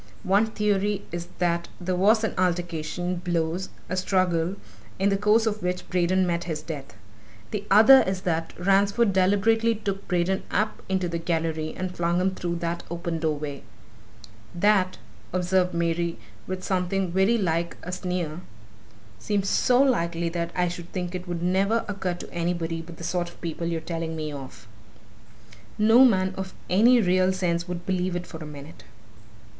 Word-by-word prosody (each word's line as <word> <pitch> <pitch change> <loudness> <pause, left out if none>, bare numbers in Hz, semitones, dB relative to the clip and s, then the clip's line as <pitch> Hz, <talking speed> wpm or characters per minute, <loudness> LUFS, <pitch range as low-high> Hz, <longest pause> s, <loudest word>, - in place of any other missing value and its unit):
One 200 +4 +3
theory 205 -2 0
is 175 0 -5
that 170 -1 0
there 180 0 -1
was 215 +5 +4
an 220 - 0
altercation, 175 0 -1
blows, 175 +1 -1 0.2
a 185 - -2
struggle, 185 -1 +1 0.4
in 195 +1 +2
the 200 - +2
course 210 +3 +3
of 215 -1 -1
which 180 0 -2
Braden 185 +1 +2
met 170 -1 -1
his 155 -3 -4
death; 145 -4 -7 0.6
the 205 -1 -3
other 225 +7 +8
is 190 -1 -1
that 165 -2 -1
Ransford 200 +4 +3
deliberately 215 +5 +3
took 200 -2 -4
Braden 180 +2 +1
up 215 +1 -1
into 190 -2 0
the 170 0 -3
gallery 160 -2 -2
and 185 -1 -4
flung 175 +1 +1
him 190 +1 +1
through 175 -2 -3
that 170 0 -3
open 170 -1 -3
doorway 150 -3 -2 0.5
" 110 +3 -21 0.2
"That," 185 -3 +1 0.3
observed 180 0 +1
Mary, 170 0 0 0.3
with 185 0 -4
something 185 0 0
very 190 +6 +3
like 170 -4 -1
a 180 - -5
sneer, 180 -3 -3 0.8
"seems 200 -2 -1
so 250 0 +3
likely 170 -10 +1
that 170 0 -2
I 180 -1 +2
should 175 0 -7
think 180 -1 -3
it 180 0 -5
would 175 -1 -3
never 195 +5 +2
occur 195 -3 -2
to - - -10
anybody 170 -1 -2
but 165 0 -11
the - - -9
sort 175 0 -1
of - - -18
people 170 0 -4
you're 165 -1 -1
telling 165 0 -4
me 155 -1 -4
of! 130 -6 -9 1.1
No 225 +4 +6
man 190 -6 +3
of 190 0 -6 0.2
any 235 +7 +6
real 185 -2 +3
sense 175 -2 -1
would 175 0 -5
believe 185 -1 -1
it 175 0 -3
for 165 - -9
a - - -8
minute!" 145 +1 -11
180 Hz, 170 wpm, -25 LUFS, 170-195 Hz, 1.1 s, other